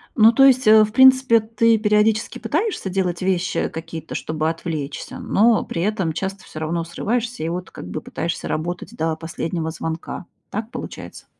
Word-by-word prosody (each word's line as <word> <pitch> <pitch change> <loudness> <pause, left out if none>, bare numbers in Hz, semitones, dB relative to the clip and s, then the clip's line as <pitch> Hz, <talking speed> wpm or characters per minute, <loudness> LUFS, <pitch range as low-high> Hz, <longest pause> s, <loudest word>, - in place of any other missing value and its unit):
Ну, 225 -1 +7
то 270 +3 +4
есть, 260 -4 +5
э, 215 0 +8
в 210 - -2
принципе 260 -2 +6
ты 225 +1 +2
периодически 215 +1 +1
пытаешься 310 - -2
делать 180 -2 -1
вещи 185 -1 0
какие-то, 160 -1 -7
чтобы 155 0 -2
отвлечься, 160 -3 -5
но 225 +2 +3
при 170 - -4
этом 190 -6 -1
часто 190 +3 -4
всё 155 - -9
равно 165 +2 -2
срываешься 230 +4 -3
и 165 - -1
вот 180 +2 -5
как 90 - -9
бы - - -4
пытаешься 170 - -4
работать 170 +3 -4
до 160 0 -1
последнего 165 0 -4
звонка, 160 +2 -5 0.2
так 220 +3 -5
получается? - - -8
190 Hz, 170 wpm, -21 LUFS, 165-225 Hz, 0.2 s, э